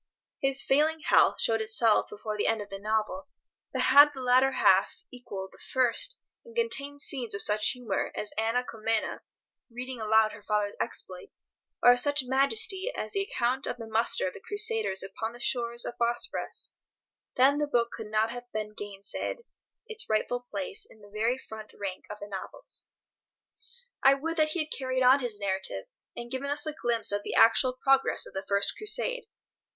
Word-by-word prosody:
His 270 Hz, 0 st, +2 dB
failing 310 Hz, +3 st, +2 dB
health -, -, +4 dB
showed 225 Hz, -1 st, +2 dB
itself 220 Hz, 0 st, +2 dB
before 215 Hz, +1 st, -6 dB
the 210 Hz, -, -1 dB
end 225 Hz, 0 st, +1 dB
of 205 Hz, -1 st, -8 dB
the 195 Hz, -, -6 dB
novel, 220 Hz, +7 st, -2 dB, 0.4 s
but -, -, -1 dB
had 285 Hz, +3 st, +8 dB
the 265 Hz, -, -6 dB
latter 255 Hz, +2 st, +3 dB
half 190 Hz, -5 st, +3 dB
equalled 200 Hz, -7 st, -8 dB
the -, -, -18 dB
first, 260 Hz, -, 0 dB, 0.3 s
and 470 Hz, -1 st, -15 dB
contained 285 Hz, -12 st, -1 dB
scenes 250 Hz, -8 st, -1 dB
of 200 Hz, -, -1 dB
such 210 Hz, +1 st, +4 dB
humour 240 Hz, -6 st, -3 dB
as 210 Hz, -, -5 dB
Anna 225 Hz, +3 st, 0 dB
Comnena 225 Hz, -2 st, -2 dB, 0.5 s
reading 250 Hz, 0 st, -7 dB
aloud 220 Hz, 0 st, +3 dB
her 205 Hz, -, -11 dB
father's 210 Hz, -1 st, -1 dB
exploits, 455 Hz, -5 st, -6 dB, 0.4 s
or 245 Hz, -, +9 dB
of 245 Hz, -, +4 dB
such 285 Hz, +1 st, +3 dB
majesty 380 Hz, -, +3 dB
as -, -, -4 dB
the 395 Hz, -, -1 dB
account 260 Hz, -8 st, -1 dB
of -, -, -3 dB
the 230 Hz, -2 st, -8 dB
muster 220 Hz, -1 st, +3 dB
of 185 Hz, -, -5 dB
the -, -, -10 dB
Crusaders 430 Hz, -, +1 dB
upon 220 Hz, +4 st, -5 dB
the 240 Hz, -, -12 dB
shores 235 Hz, -2 st, -1 dB
of -, -, -4 dB
the -, -, -34 dB
Bosphorus, 240 Hz, +10 st, 0 dB, 0.6 s
then 275 Hz, +3 st, +4 dB
the 295 Hz, -, 0 dB
book 235 Hz, -4 st, +1 dB
could 225 Hz, -2 st, -7 dB
not 215 Hz, +1 st, +1 dB
have 245 Hz, 0 st, -9 dB
been 215 Hz, 0 st, -4 dB
gainsaid 205 Hz, -, -6 dB, 0.4 s
its 445 Hz, -1 st, 0 dB
rightful 220 Hz, +3 st, 0 dB
place 200 Hz, -6 st, -5 dB
in 220 Hz, -, -17 dB
the 205 Hz, 0 st, -16 dB
very 225 Hz, +4 st, 0 dB
front 220 Hz, -4 st, -11 dB
rank 195 Hz, -2 st, -5 dB
of 210 Hz, 0 st, -8 dB
the 205 Hz, -, -8 dB
novels. 195 Hz, -2 st, -6 dB, 1.2 s
I 270 Hz, +1 st, +7 dB
would 330 Hz, +4 st, -4 dB
that 310 Hz, -1 st, +3 dB
he 330 Hz, +2 st, -1 dB
had 305 Hz, -, -16 dB
carried 260 Hz, -1 st, -1 dB
on 255 Hz, +3 st, +6 dB
his 235 Hz, -5 st, -4 dB
narrative, 190 Hz, -, -2 dB, 0.3 s
and 240 Hz, 0 st, -7 dB
given 270 Hz, +2 st, -3 dB
us 290 Hz, +1 st, +1 dB
a 310 Hz, -, -3 dB
glimpse 235 Hz, -7 st, +1 dB
of 205 Hz, 0 st, -1 dB
the -, -, -5 dB
actual 240 Hz, +3 st, +5 dB
progress 270 Hz, +1 st, +2 dB
of -, -, -13 dB
the 190 Hz, 0 st, -5 dB
First 200 Hz, 0 st, +1 dB
Crusade. -, -, 0 dB
240 Hz, 190 wpm, -28 LUFS, 215-275 Hz, 1.2 s, or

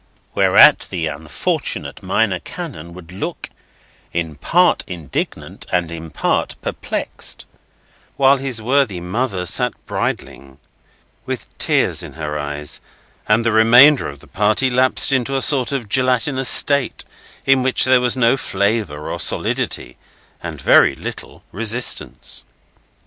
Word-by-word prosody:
Whereat -, -, +5 dB
the 85 Hz, -3 st, -3 dB
unfortunate 75 Hz, 0 st, -4 dB
Minor -, -, 0 dB
Canon 85 Hz, +2 st, -9 dB
would 90 Hz, -1 st, -13 dB
look, 95 Hz, -, -6 dB, 0.6 s
in 85 Hz, -2 st, -3 dB
part 175 Hz, -, +2 dB
indignant 85 Hz, -7 st, -6 dB
and 90 Hz, -2 st, -1 dB
in 80 Hz, -1 st, -8 dB
part 75 Hz, -, -1 dB
perplexed; -, -, -5 dB, 0.7 s
while 135 Hz, 0 st, +4 dB
his 130 Hz, -5 st, -3 dB
worthy 125 Hz, -6 st, +1 dB
mother 95 Hz, +1 st, -3 dB
sat 125 Hz, +7 st, +1 dB
bridling, 70 Hz, -1 st, -5 dB, 0.7 s
with -, -, -6 dB
tears -, -, +1 dB
in -, -, -9 dB
her 75 Hz, -1 st, -5 dB
eyes, 75 Hz, 0 st, -4 dB, 0.5 s
and 110 Hz, +2 st, +2 dB
the 115 Hz, -, +2 dB
remainder 120 Hz, +6 st, +6 dB
of 70 Hz, -1 st, -12 dB
the -, -, -14 dB
party 110 Hz, +6 st, +1 dB
lapsed 130 Hz, +2 st, +3 dB
into 130 Hz, +1 st, 0 dB
a -, -, +1 dB
sort 130 Hz, -3 st, +3 dB
of 135 Hz, -6 st, -3 dB
gelatinous 130 Hz, +2 st, +2 dB
state, 140 Hz, -2 st, +4 dB, 0.4 s
in 135 Hz, -1 st, +3 dB
which 130 Hz, 0 st, +3 dB
there 130 Hz, -1 st, +4 dB
was 125 Hz, +1 st, +2 dB
no 125 Hz, +1 st, +3 dB
flavour 100 Hz, -, -2 dB
or -, -, -5 dB
solidity, 60 Hz, -, -1 dB, 0.4 s
and -, -, -7 dB
very -, -, +4 dB
little -, -, -8 dB
resistance. 115 Hz, +5 st, -1 dB
110 Hz, 130 wpm, -18 LUFS, 85-130 Hz, 0.7 s, remainder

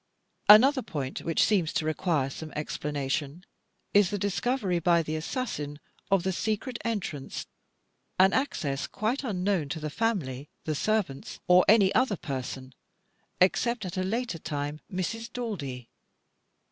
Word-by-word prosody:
Another 260 Hz, +6 st, +8 dB
point 140 Hz, -, -4 dB
which 165 Hz, -2 st, +2 dB
seems 185 Hz, -7 st, +2 dB
to 155 Hz, -, 0 dB
require 155 Hz, -3 st, 0 dB
some 155 Hz, +2 st, -7 dB
explanation, 150 Hz, +2 st, -3 dB, 0.5 s
is 205 Hz, -3 st, +5 dB
the 205 Hz, -, -2 dB
discovery 200 Hz, 0 st, 0 dB
by 170 Hz, 0 st, +3 dB
the 155 Hz, 0 st, -3 dB
assassin 155 Hz, -, -3 dB, 0.3 s
of 195 Hz, -3 st, +3 dB
the 190 Hz, -, 0 dB
secret 220 Hz, +6 st, -2 dB
entrance, 200 Hz, -, -3 dB, 0.7 s
an 190 Hz, +1 st, +5 dB
access 145 Hz, -, -1 dB
quite 235 Hz, +7 st, -2 dB
unknown 190 Hz, -, 0 dB
to 160 Hz, -, -3 dB
the 150 Hz, -1 st, -4 dB
family, 150 Hz, -, -1 dB
the 155 Hz, -, -1 dB
servants, 185 Hz, -5 st, -1 dB
or 180 Hz, 0 st, +7 dB
any 200 Hz, -2 st, +6 dB
other 255 Hz, -7 st, +2 dB
person, 130 Hz, -2 st, -5 dB, 0.7 s
except, 220 Hz, +4 st, +2 dB
at 180 Hz, -, -5 dB
a 185 Hz, -, 0 dB
later 220 Hz, -1 st, -2 dB
time, 145 Hz, -1 st, -4 dB
Mrs. 225 Hz, +6 st, -3 dB
Daldy. 150 Hz, -, -5 dB
180 Hz, 135 wpm, -28 LUFS, 150-215 Hz, 0.7 s, Another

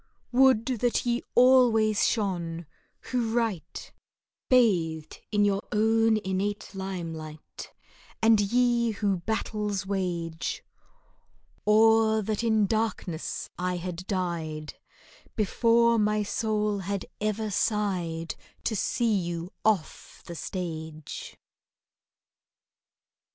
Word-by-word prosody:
Would 255 Hz, -3 st, +5 dB
that 245 Hz, +2 st, +1 dB
ye 240 Hz, 0 st, +1 dB
always 240 Hz, -4 st, +5 dB
shone, 175 Hz, -6 st, -2 dB, 0.4 s
who 240 Hz, -3 st, -2 dB
write, 205 Hz, -9 st, -3 dB, 0.6 s
Bathed 170 Hz, -11 st, +2 dB
in 205 Hz, -1 st, +3 dB
your 200 Hz, -1 st, +1 dB
own 225 Hz, +1 st, +3 dB
innate 200 Hz, +3 st, -2 dB
limelight, 165 Hz, -5 st, -7 dB, 0.5 s
And 225 Hz, -1 st, +5 dB
ye 235 Hz, +2 st, +2 dB
who 200 Hz, -2 st, 0 dB
battles 210 Hz, +1 st, -2 dB
wage, 175 Hz, -4 st, -3 dB, 1.0 s
Or 220 Hz, 0 st, +5 dB
that 215 Hz, +2 st, -2 dB
in 220 Hz, -2 st, +3 dB
darkness 215 Hz, -6 st, -2 dB
I 180 Hz, 0 st, -1 dB
had 180 Hz, +1 st, -6 dB
died 165 Hz, -5 st, -3 dB, 0.6 s
Before 230 Hz, +2 st, +3 dB
my 210 Hz, 0 st, +2 dB
soul 210 Hz, -1 st, -1 dB
had 195 Hz, 0 st, -3 dB
ever 215 Hz, 0 st, -1 dB
sighed 180 Hz, -7 st, -1 dB, 0.3 s
To 220 Hz, -, -1 dB
see 230 Hz, +2 st, +1 dB
you 175 Hz, -2 st, -3 dB
off 210 Hz, -7 st, -1 dB
the 170 Hz, -, -7 dB
stage! 160 Hz, -4 st, -6 dB
205 Hz, 95 wpm, -27 LUFS, 175-225 Hz, 1.0 s, Would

